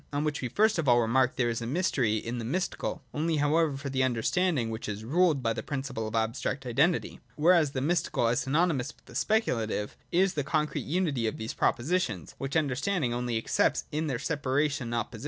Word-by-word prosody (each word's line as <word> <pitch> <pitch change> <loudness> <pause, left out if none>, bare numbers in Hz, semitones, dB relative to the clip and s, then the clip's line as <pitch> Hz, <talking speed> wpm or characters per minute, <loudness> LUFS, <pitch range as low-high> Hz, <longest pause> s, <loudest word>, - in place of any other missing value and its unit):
On 145 +1 -1
which 150 -1 -1
we 125 - -1
first 210 - +2
of 155 - -1
all 120 0 +6
remark 125 +2 +2
that - - -29
there 125 -2 +2
is 115 0 -2
mystery 125 -4 +1
in 115 +2 -4
the - - -4
mystical, 170 +11 -2
only 160 +2 0
however 150 0 +2
for 140 0 -5
the 130 -1 +1
un 130 -2 +1
derstanding 145 0 +1
which 110 0 -5
is 105 +1 -5
ruled 155 0 +2
by 115 0 +1
the 110 - -4
principle 130 -4 -4
of 110 - -5
abstract 120 +4 -1
identity; 140 +8 +1 0.2
whereas 160 -2 +4
the 130 - -1
mystical, 160 -4 +1
as 115 +1 +2
synonymous 150 -1 0
with - - -29
the - - -14
speculative, 115 - 0 0.2
is 190 +2 +3
the 145 -4 -1
concrete 150 +2 -1
unity 150 -8 0
of 110 - -3
those 110 0 -4
propositions, 120 - 0
which 135 +3 -1
understanding 145 -1 0
only 120 -1 -1
accepts 110 - +1
in 155 +1 -1
their 130 -5 -1
separation 145 -2 -1
and 120 - -3
opposition. 115 -1 -3
135 Hz, 210 wpm, -29 LUFS, 120-160 Hz, 0.2 s, all